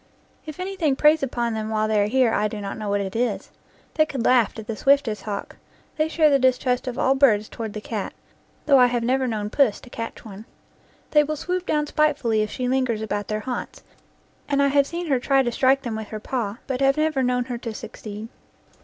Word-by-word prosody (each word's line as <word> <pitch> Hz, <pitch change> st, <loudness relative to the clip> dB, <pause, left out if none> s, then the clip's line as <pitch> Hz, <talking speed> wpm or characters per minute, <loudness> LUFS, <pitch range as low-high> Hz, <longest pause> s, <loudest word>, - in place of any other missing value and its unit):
If 310 Hz, +2 st, -8 dB
anything 365 Hz, -7 st, 0 dB
preys 305 Hz, +3 st, +4 dB
upon 240 Hz, -3 st, -1 dB
them 220 Hz, 0 st, -3 dB
while 215 Hz, 0 st, 0 dB
they 215 Hz, -1 st, +2 dB
are 205 Hz, -, +2 dB
here 245 Hz, 0 st, +2 dB
I 210 Hz, -, +1 dB
do 210 Hz, 0 st, -6 dB
not 200 Hz, -1 st, -5 dB
know 215 Hz, -2 st, -5 dB
what 200 Hz, 0 st, +1 dB
it 195 Hz, +1 st, -5 dB
is. 230 Hz, -3 st, -1 dB, 0.4 s
They 310 Hz, -1 st, +3 dB
could 260 Hz, -6 st, -3 dB
laugh 245 Hz, -4 st, +3 dB
at 220 Hz, -, -7 dB
the 225 Hz, -, -4 dB
swiftest 275 Hz, -3 st, +2 dB
hawk. 205 Hz, -2 st, -6 dB, 0.4 s
They 310 Hz, 0 st, +1 dB
share 315 Hz, -1 st, +3 dB
the 275 Hz, -, +4 dB
distrust 255 Hz, 0 st, +1 dB
of 245 Hz, -, -4 dB
all 265 Hz, -, +3 dB
birds 225 Hz, -7 st, +3 dB
toward 220 Hz, -3 st, -6 dB
the 215 Hz, -, -6 dB
cat, 215 Hz, -2 st, -4 dB, 0.5 s
though 280 Hz, -3 st, +6 dB
I 250 Hz, -, +7 dB
have 240 Hz, -1 st, -1 dB
never 260 Hz, +2 st, +1 dB
known 210 Hz, -3 st, -3 dB
Puss 260 Hz, -6 st, +2 dB
to 250 Hz, -, -15 dB
catch 230 Hz, +1 st, -7 dB
one. 210 Hz, 0 st, -10 dB, 0.7 s
They 300 Hz, -1 st, +5 dB
will 305 Hz, +1 st, -3 dB
swoop 360 Hz, +4 st, -3 dB
down 300 Hz, -1 st, +1 dB
spitefully 290 Hz, -8 st, +1 dB
if 215 Hz, -, -1 dB
she 250 Hz, +3 st, -3 dB
lingers 250 Hz, -4 st, 0 dB
about 205 Hz, -2 st, -3 dB
their 215 Hz, 0 st, -2 dB
haunts, 250 Hz, +1 st, -5 dB, 0.7 s
and 280 Hz, -1 st, +1 dB
I 280 Hz, 0 st, +4 dB
have 280 Hz, 0 st, +3 dB
seen 345 Hz, +3 st, -4 dB
her 275 Hz, -5 st, +1 dB
try 270 Hz, +1 st, +2 dB
to 240 Hz, -, -1 dB
strike 265 Hz, +3 st, +2 dB
them 235 Hz, -3 st, -3 dB
with 220 Hz, -1 st, -5 dB
her 215 Hz, -, -6 dB
paw, 220 Hz, -2 st, -3 dB
but 265 Hz, -1 st, -3 dB
have 275 Hz, +1 st, +3 dB
never 310 Hz, -3 st, +1 dB
known 250 Hz, -1 st, +1 dB
her 245 Hz, -2 st, -5 dB
to 230 Hz, -1 st, -5 dB
succeed. 215 Hz, 0 st, -8 dB
250 Hz, 230 wpm, -23 LUFS, 220-275 Hz, 0.7 s, I